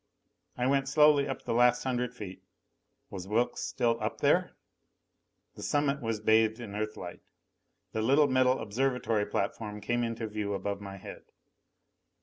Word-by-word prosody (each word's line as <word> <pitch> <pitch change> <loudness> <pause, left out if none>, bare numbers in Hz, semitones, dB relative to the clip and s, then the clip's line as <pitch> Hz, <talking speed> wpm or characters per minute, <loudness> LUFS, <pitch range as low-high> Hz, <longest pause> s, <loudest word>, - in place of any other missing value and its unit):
I 125 - 0
went 135 0 +2
slowly 150 0 +5
up 135 - -5
the - - -2
last 125 +1 +4
hundred 125 -2 -1
feet. 100 -5 -8 0.7
Was 95 -1 -6
Wilks 115 +4 0
still 115 -1 0
up - - -2
there? - - +2 1.0
The - - -11
summit 145 -1 0
was 115 -2 -2
bathed 110 +1 +3
in 115 -4 -7
Earthlight. 105 -4 -5 0.7
The 110 - -2
little 140 +6 +4
metal 130 -1 +3
observatory 115 -2 0
platform 105 +1 -3
came 120 +4 -1
into 115 0 -3
view 105 -1 -3
above 100 0 -3
my 100 -1 -8
head. - - -10
115 Hz, 145 wpm, -30 LUFS, 105-130 Hz, 1.0 s, slowly